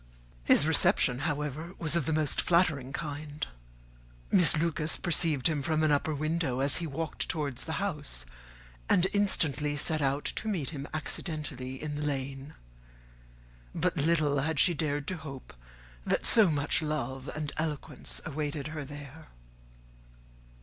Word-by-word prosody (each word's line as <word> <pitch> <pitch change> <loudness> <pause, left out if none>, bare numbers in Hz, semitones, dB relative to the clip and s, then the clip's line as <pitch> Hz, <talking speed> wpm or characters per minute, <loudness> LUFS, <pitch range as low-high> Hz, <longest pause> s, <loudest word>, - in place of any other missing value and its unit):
His 145 - +5
reception, 135 -5 +3
however, 150 +4 -4
was 165 -1 +1
of 170 -6 0
the - - +1
most 155 -2 +1
flattering 160 -7 +2
kind. 150 0 -4 0.9
Miss 180 -4 +6
Lucas 160 -1 0
perceived 165 -6 +2
him 155 -3 0
from 155 +1 0
an 155 - +3
upper 150 +1 +1
window 155 -3 -1
as 140 0 +5
he 170 - -2
walked 160 +2 -3
towards 140 -5 -2
the 160 - -4
house, 150 - -2 0.6
and 180 - +5
instantly 150 - +1
set 155 +2 +2
out 140 +1 0
to 220 - -3
meet 175 -10 -1
him 145 -2 -6
accidentally 150 -5 -4
in 150 -1 -4
the - - -3
lane. 135 -1 -4 1.2
But 180 +2 0
little 150 -2 +2
had 150 +1 0
she 180 - +5
dared 145 -1 -2
to 185 - -3
hope 140 -4 -9 0.5
that - - 0
so 220 -5 +6
much 145 0 0
love 135 -3 -3
and 150 -1 -4
eloquence 145 - -4
awaited 150 0 -3
her 155 -1 -5
there. 145 +2 -10
150 Hz, 145 wpm, -30 LUFS, 140-160 Hz, 1.2 s, Miss